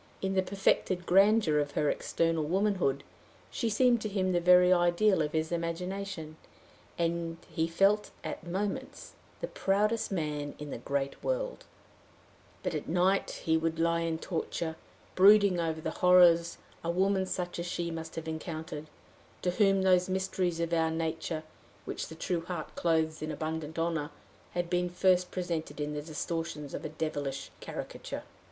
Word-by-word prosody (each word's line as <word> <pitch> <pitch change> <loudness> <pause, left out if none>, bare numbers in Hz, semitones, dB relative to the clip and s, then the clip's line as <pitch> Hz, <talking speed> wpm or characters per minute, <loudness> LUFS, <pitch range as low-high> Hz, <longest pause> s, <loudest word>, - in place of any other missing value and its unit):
In 190 0 -1
the 190 - +3
perfected 185 -1 +1
grandeur 195 -4 +5
of 145 -1 -2
her 150 - +1
external 165 +1 0
womanhood, 180 -5 +1 0.5
she 235 - -1
seemed 240 +1 +3
to 215 - -2
him 190 -2 0
the 175 - +2
very 180 +1 +6
ideal 175 +2 +3
of 150 0 -1
his 160 +1 0
imagination, 170 -1 -4 0.6
and 170 -1 -1
he 160 0 0
felt 195 +5 +3
at - - -5
moments 190 +4 -4 0.3
the - - -2
proudest 210 - 0
man 150 -5 -2
in 150 -1 -7
the - - -5
great 140 -1 -3
world; - - -2 1.0
but - - -1
at - - -4
night 185 +2 +1
he 160 - +3
would 160 0 -1
lie 170 0 +2
in 165 -1 -1
torture, 160 -1 -3 0.4
brooding 200 -1 +6
over 160 -1 -1
the 160 0 -3
horrors 175 -2 +5 0.3
a 170 - -2
woman 190 +2 +2
such 180 -1 -3
as 170 - -3
she 170 -1 -2
must 165 0 -6
have 160 0 -5
encountered, 160 -1 -5 0.6
to 180 - +2
whom 195 0 +3
those 185 -1 +4
mysteries 185 -2 -1
of 170 0 -1
our 165 -1 +3
nature, 160 0 -2 0.4
which - - -4
the 160 - -9
true 170 +1 -1
heart 180 0 -5
clothes 160 -2 +1
in 155 0 -3
abundant 160 0 -4
honor, 165 -3 -1 0.4
had 175 0 -1
been 180 0 0
first 180 0 +3
presented 165 -5 -3
in 150 0 -2
the 150 - -3
distortions 155 -1 -4
of - - -5
a 155 - -4
devilish 145 -3 -3
caricature. - - -6
170 Hz, 160 wpm, -30 LUFS, 160-185 Hz, 1.0 s, very